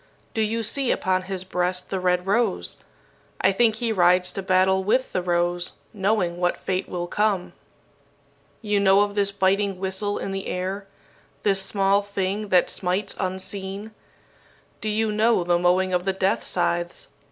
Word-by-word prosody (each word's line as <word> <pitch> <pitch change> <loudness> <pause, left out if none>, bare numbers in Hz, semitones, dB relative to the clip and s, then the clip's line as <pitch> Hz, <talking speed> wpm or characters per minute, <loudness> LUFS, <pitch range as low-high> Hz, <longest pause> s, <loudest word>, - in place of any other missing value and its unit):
Do 220 - 0
you 225 +1 0
see 260 +4 -1
upon 185 0 +1
his 185 0 -4
breast 180 0 -1
the 190 - -1
red 180 0 +1
rose? 195 - 0 0.6
I 195 - +4
think 220 +2 +3
he 230 0 -1
rides 180 -2 +4
to 195 - -4
battle 190 0 +3
with 250 +6 +1
the 185 - 0
rose, 175 0 0 0.2
knowing 195 -4 0
what 175 0 0
fate 185 -1 -3
will 175 -1 -3
come. 205 0 0 1.1
"You 210 -1 +1
know 195 0 +5
of 205 0 0
this 200 -1 +1
biting 195 0 +1
whistle 190 +2 -2
in 195 - -4
the 195 0 -4
air 190 +2 -3 0.6
this 195 -2 +3
small 195 0 +2
thing 200 +1 -3
that 185 -2 +4
smites 190 +2 -1
unseen? 190 +2 -4 0.9
Do 215 - -2
you 215 +1 +1
know 215 -2 +3
the 175 0 +2
mowing 180 +1 +2
of 180 0 +1
the 195 0 0
death 190 0 0
scythes? 175 -1 -1
190 Hz, 165 wpm, -24 LUFS, 180-205 Hz, 1.1 s, know